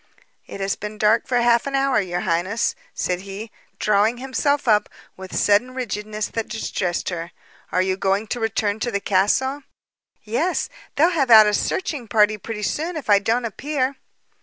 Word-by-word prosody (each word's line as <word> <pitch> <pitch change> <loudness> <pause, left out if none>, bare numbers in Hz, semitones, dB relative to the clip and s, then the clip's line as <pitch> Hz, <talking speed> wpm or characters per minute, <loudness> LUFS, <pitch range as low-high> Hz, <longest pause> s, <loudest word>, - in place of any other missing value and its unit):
"It - - -8
has 195 0 0
been 210 +1 -7
dark 215 +2 +3
for 250 - +1
half 235 +2 +3
an 275 - -2
hour, 270 -4 +2
your 175 -2 -3
highness," 185 +6 0 0.2
said 180 -1 -2
he, 200 +3 -8 0.3
drawing 210 +3 +2
himself 270 +2 -1
up 210 -2 +3 0.3
with 190 0 -9
sudden 240 +5 +2
rigidness 215 -3 -3
that 225 -1 -3
distressed 185 -5 -2
her. 170 -1 -5 0.4
"Are 185 - +2
you 190 0 -1
going 195 +2 0
to 245 - -2
return 220 -2 -1
to 240 - -1
the 200 -4 -1
castle?" 210 +9 +1 0.6
"Yes. 305 +12 -1 0.3
They'll 325 +5 +4
have 285 -7 +1
out 220 -2 +9
a 210 - +1
searching 280 - -2
party 215 0 +3
pretty 210 0 -6
soon 320 - -2
if 275 -8 -2
I 200 - +7
don't 230 +4 0
appear." 270 +3 -2
215 Hz, 175 wpm, -22 LUFS, 200-255 Hz, 0.6 s, out